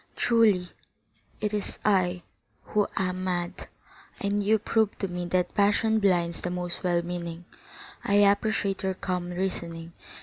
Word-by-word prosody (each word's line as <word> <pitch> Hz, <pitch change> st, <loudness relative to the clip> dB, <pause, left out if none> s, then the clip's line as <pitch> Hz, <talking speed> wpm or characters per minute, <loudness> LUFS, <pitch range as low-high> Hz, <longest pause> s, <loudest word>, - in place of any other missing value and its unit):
Truly, 210 Hz, -6 st, +3 dB, 0.7 s
it 210 Hz, 0 st, -1 dB
is 210 Hz, -1 st, -3 dB
I 185 Hz, -4 st, +2 dB, 0.4 s
who 210 Hz, -1 st, +1 dB
am 185 Hz, -1 st, -1 dB
mad, 175 Hz, -2 st, -3 dB, 0.5 s
and 205 Hz, +1 st, 0 dB
you 215 Hz, +2 st, +4 dB
prove 220 Hz, 0 st, +1 dB
to 195 Hz, -, -2 dB
me 180 Hz, -1 st, -4 dB
that 180 Hz, 0 st, 0 dB
passion 210 Hz, +2 st, +3 dB
blinds 175 Hz, -4 st, +1 dB
the 180 Hz, -, -2 dB
most 180 Hz, -1 st, -3 dB
well 175 Hz, -1 st, +2 dB
meaning. 170 Hz, -1 st, -5 dB, 0.6 s
I 200 Hz, -, +1 dB
appreciate 205 Hz, 0 st, +3 dB
your 190 Hz, -1 st, -1 dB
calm 180 Hz, -2 st, -3 dB
reasoning. 170 Hz, -2 st, -4 dB
185 Hz, 140 wpm, -27 LUFS, 175-205 Hz, 0.7 s, you